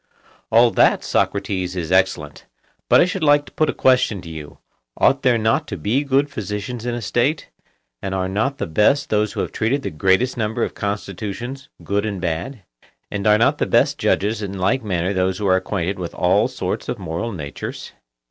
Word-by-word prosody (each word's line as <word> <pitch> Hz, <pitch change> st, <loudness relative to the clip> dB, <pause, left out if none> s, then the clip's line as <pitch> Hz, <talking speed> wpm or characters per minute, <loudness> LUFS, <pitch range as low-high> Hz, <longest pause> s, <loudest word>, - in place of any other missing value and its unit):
All 115 Hz, +1 st, +6 dB
that, -, -, +3 dB
Socrates, 95 Hz, -2 st, -1 dB
is 85 Hz, -2 st, -4 dB
excellent; 95 Hz, -6 st, 0 dB, 0.4 s
but -, -, +7 dB
I -, -, +6 dB
should 185 Hz, +1 st, -3 dB
like 145 Hz, -1 st, +4 dB
to -, -, -14 dB
put 155 Hz, -, +1 dB
a -, -, +3 dB
question 125 Hz, -6 st, +2 dB
to 80 Hz, -, -9 dB
you: 75 Hz, -2 st, -9 dB, 0.4 s
Ought 135 Hz, 0 st, +3 dB
there 125 Hz, -3 st, +3 dB
not 110 Hz, +8 st, +1 dB
to 100 Hz, -, -5 dB
be 110 Hz, -, 0 dB
good 140 Hz, +1 st, +2 dB
physicians 110 Hz, -1 st, -5 dB
in 120 Hz, -, -1 dB
a 120 Hz, -, -5 dB
State, 120 Hz, -, 0 dB, 0.5 s
and 95 Hz, 0 st, -3 dB
are 95 Hz, -1 st, -1 dB
not 110 Hz, +9 st, -1 dB
the -, -, -2 dB
best 105 Hz, -, +2 dB
those 105 Hz, -1 st, +1 dB
who -, -, -2 dB
have -, -, -3 dB
treated 135 Hz, +6 st, 0 dB
the -, -, -3 dB
greatest 95 Hz, +11 st, +1 dB
number 110 Hz, -1 st, -1 dB
of -, -, -2 dB
constitutions 105 Hz, +6 st, -5 dB
good 100 Hz, +1 st, 0 dB
and 100 Hz, -3 st, -3 dB
bad? 90 Hz, +7 st, -3 dB, 0.5 s
and 100 Hz, 0 st, -2 dB
are 105 Hz, 0 st, +6 dB
not 115 Hz, -, +2 dB
the -, -, +1 dB
best -, -, +2 dB
judges 105 Hz, +2 st, +1 dB
in 100 Hz, -1 st, -5 dB
like 120 Hz, +8 st, +1 dB
manner 95 Hz, -2 st, -1 dB
those 95 Hz, 0 st, 0 dB
who 105 Hz, -, -3 dB
are 95 Hz, -1 st, +4 dB
acquainted 95 Hz, 0 st, -2 dB
with 85 Hz, -2 st, -5 dB
all 100 Hz, +5 st, +3 dB
sorts 130 Hz, -, -4 dB
of -, -, -2 dB
moral 90 Hz, +4 st, -4 dB
natures? 75 Hz, -8 st, -6 dB
105 Hz, 200 wpm, -21 LUFS, 95-125 Hz, 0.5 s, but